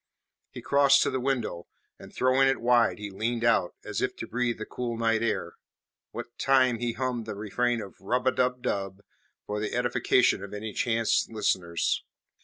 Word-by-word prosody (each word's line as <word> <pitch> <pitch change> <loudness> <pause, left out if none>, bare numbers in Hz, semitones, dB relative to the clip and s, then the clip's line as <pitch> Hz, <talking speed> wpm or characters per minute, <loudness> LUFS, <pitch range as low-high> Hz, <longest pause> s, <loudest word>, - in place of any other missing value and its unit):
He - - -10
crossed 140 -1 +5
to - - 0
the 130 - -1
window, 125 -10 -2 0.3
and - - -12
throwing 130 +1 +3
it 135 - +1
wide 120 0 +3
he 105 -1 -6
leaned 115 +4 -2
out, 115 -6 +2
as - - -3
if - - -1
to - - -6
breathe 120 0 -1
the 110 - -6
cool 120 -2 -4
night 115 -1 +1
air, 115 -1 -2 0.5
what 120 - -9
time 130 -3 +3
he 120 -1 -1
hummed 120 -2 -3
the 105 - -4
refrain 120 +4 -1
of 100 - -12
`Rub 125 +6 -1
a 130 - +4
dub 125 -1 0
dub' 100 0 -3 0.4
for 105 0 -3
the 105 +1 -3
edification 125 -3 +2
of 100 +1 -7
any 105 0 -5
chance 115 -2 +1
listeners. 90 -6 0
115 Hz, 185 wpm, -27 LUFS, 105-125 Hz, 0.5 s, crossed